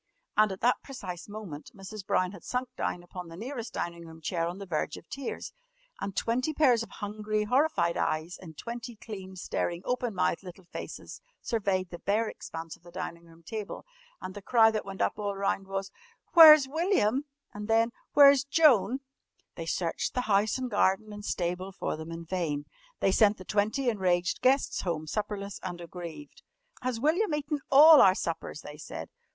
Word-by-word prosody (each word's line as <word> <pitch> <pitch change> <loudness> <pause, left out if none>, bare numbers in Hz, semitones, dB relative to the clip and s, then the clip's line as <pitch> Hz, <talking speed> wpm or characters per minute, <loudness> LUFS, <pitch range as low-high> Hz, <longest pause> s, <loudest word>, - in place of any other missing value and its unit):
And 215 -1 +4
at 190 - -7
that 245 +2 +3
precise 185 -10 -7
moment 205 -8 -8
Mrs. 195 +1 -8
Brown 185 0 +2
had 195 -4 -12
sunk 250 0 -2
down 175 - -2
upon 180 0 -8
the 165 0 -10
nearest 240 +2 -5
dining 170 0 -4
room 160 0 -12
chair 165 +1 -1
on 175 +2 -5
the 200 - -7
verge 155 -4 -2
of - - -14
tears, 275 -2 -5 0.5
and 195 - -4
twenty 255 +9 0
pairs 250 -7 +4
of 230 - -6
hungry 210 0 -3
horrified 250 - +2
eyes 155 +3 -1
in 165 -4 -11
twenty 235 - -6
clean, 195 -4 -9
staring, 175 -1 -3
open 245 -3 -1
mouthed 180 -2 +1
little 185 0 -11
faces - - -8 0.2
surveyed 195 -5 -1
the 175 - -7
bare 215 +3 +1
expanse 165 -5 -7
of - - -26
the 175 - -15
dining 170 0 -6
room 165 0 -18
table. 215 +4 -6 0.3
And 185 - -7
the 205 - -8
cry 225 +1 +5
that 215 -1 -3
went 195 -1 -2
up - - -1
all 205 -1 -2
round 195 0 -1
was: 195 0 -4 0.4
"Where's 310 -4 +10
William?" 290 - +1 0.3
And 210 0 -6
then: 225 +1 +3 0.2
"Where's 280 -1 +8
Joan?" 275 -4 +4 0.5
They - - -7
searched - - -1
the 250 - +2
house 210 -1 +2
and 255 -1 -4
garden 205 +1 +2
and 205 0 -8
stable 180 0 -2
for 190 - -3
them 160 +1 -8
in 165 0 -7
vain. 160 -5 -2 0.4
They 195 - +3
sent 210 +1 +4
the 185 - -11
twenty 215 +8 0
enraged 180 -5 +1
guests 265 +2 +2
home 165 -4 -2
supperless 200 +2 -4
and 175 -2 -5
aggrieved. 175 - -9 0.4
"Has 250 -2 -2
William 315 - +2
eaten 295 0 -2
all 300 +2 +9
our 190 -1 +6
suppers?" 165 -4 -4
they 150 0 -10
said. 150 - -8
200 Hz, 185 wpm, -29 LUFS, 175-240 Hz, 0.5 s, Where's